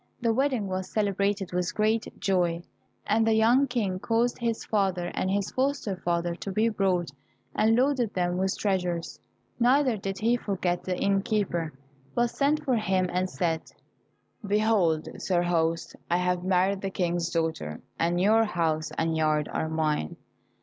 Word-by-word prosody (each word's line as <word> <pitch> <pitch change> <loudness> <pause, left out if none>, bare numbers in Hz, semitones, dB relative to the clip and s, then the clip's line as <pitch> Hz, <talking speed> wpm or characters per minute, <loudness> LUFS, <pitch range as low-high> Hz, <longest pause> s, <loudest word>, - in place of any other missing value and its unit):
The 230 -1 +1
wedding 260 -3 +1
was 185 0 -3
celebrated 200 -2 0
with 180 0 -1
great 220 +1 +1
joy, 175 -3 +1 0.4
and 220 +2 +2
the 220 - +4
young 240 +5 +4
King 210 -7 -1
caused 230 +3 0
his 230 -2 -2
father 190 -4 0
and 185 - -1
his 200 0 -1
foster 265 -6 -1
father 175 -1 -1
to 195 - -5
be 215 +4 +2
brought, 185 -6 0 0.4
and 225 +1 +3
loaded 255 -3 +1
them 180 -1 0
with 190 0 0
treasures. 180 -4 -1 0.4
Neither 255 0 +3
did 195 -1 -4
he 230 +3 +2
forget 185 -5 -2
the 185 -1 -2
inn 195 0 +2
keeper, 185 -7 -1 0.4
but 240 0 +2
sent 300 +2 +1
for 255 -4 +2
him 190 -4 0
and 185 +1 0
said, 165 -3 -1 0.8
"Behold, 200 -6 +2
sir 175 -2 +1
host, 165 -1 0
I 175 - +3
have 180 0 0
married 190 +1 +2
the 195 - -2
King's 175 -2 -1
daughter, 160 - -2 0.2
and 170 +1 +1
your 215 +4 +4
house 165 -6 -1
and 165 0 0
yard 155 -1 +1
are 160 - -1
mine." 155 - -1
190 Hz, 160 wpm, -27 LUFS, 175-220 Hz, 0.8 s, the